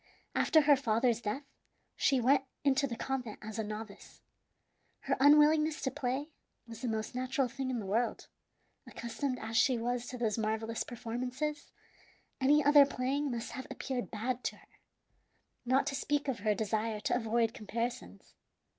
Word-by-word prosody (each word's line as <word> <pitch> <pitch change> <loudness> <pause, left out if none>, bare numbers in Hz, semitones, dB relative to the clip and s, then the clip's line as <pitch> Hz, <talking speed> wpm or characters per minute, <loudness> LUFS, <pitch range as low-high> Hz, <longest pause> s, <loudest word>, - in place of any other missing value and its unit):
After 315 - +4
her 290 -1 +6
father's 235 -2 +1
death 225 +6 -3 0.5
she 270 - +2
went 265 +3 +4 0.2
into 280 0 +3
the 235 - -4
convent 250 -3 -3
as 220 +1 -6
a - - 0
novice. 215 0 -8 0.8
Her - - 0
unwillingness 300 +2 +5
to 265 - 0
play 275 +2 -3 0.3
was 230 -1 -10
the 255 - -2
most 220 0 -2
natural 255 +1 0
thing 265 +2 -4
in 255 - -1
the 215 - -4
world; 225 +5 -1 0.6
accustomed 255 +3 -3
as 225 -1 -6
she 255 -3 +4
was 245 +1 -2
to 250 - -6
those 225 -2 0
marvellous 220 +1 -1
performances, 250 +6 -4 0.7
any 285 +2 +4
other 290 0 +8
playing 280 +2 -1
must 235 -2 -4
have 260 - -7
appeared 255 -3 -4
bad 245 +3 -3
to - - -1
her, - - -21 1.0
not 260 +2 +3
to 275 - -2
speak 290 +1 -1
of 260 -5 -1
her 210 0 +1
desire 220 0 -1
to - - 0
avoid 230 -1 +1
comparisons. 235 +1 -5
250 Hz, 160 wpm, -32 LUFS, 225-275 Hz, 1.0 s, other